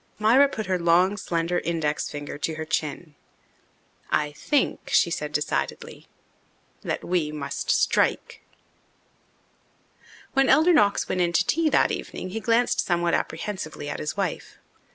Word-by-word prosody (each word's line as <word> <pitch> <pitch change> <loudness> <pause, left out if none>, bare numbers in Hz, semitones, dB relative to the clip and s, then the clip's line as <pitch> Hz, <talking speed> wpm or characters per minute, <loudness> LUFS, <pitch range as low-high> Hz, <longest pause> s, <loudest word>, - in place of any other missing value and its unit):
Myra 245 +7 +5
put 220 -5 -5
her 185 -1 0
long, 175 +3 +3
slender 170 -3 -1
index 160 -3 -2
finger 145 0 -7
to 160 +2 -2
her 160 0 -5
chin. 155 +1 -3 1.0
"I 150 -1 0
think," 275 - -1
she 170 - +3
said 150 -2 -3
decidedly, 150 0 -3 0.7
"that - - -3
we 170 -4 -1
must 150 -2 -5
strike." - - +1 1.9
When 270 -2 +3
Elder 325 +3 +5
Knox 205 -9 +3
went 185 - -1
in 170 -1 +1
to 180 +2 +2
tea 325 +6 +2
that - - +3
evening 185 - -5
he 225 - -3
glanced 230 +2 +1
somewhat 175 -1 +1
apprehensively 155 -7 -3
at - - -4
his 155 - -4
wife. 190 -4 -3
175 Hz, 140 wpm, -25 LUFS, 155-210 Hz, 1.9 s, Myra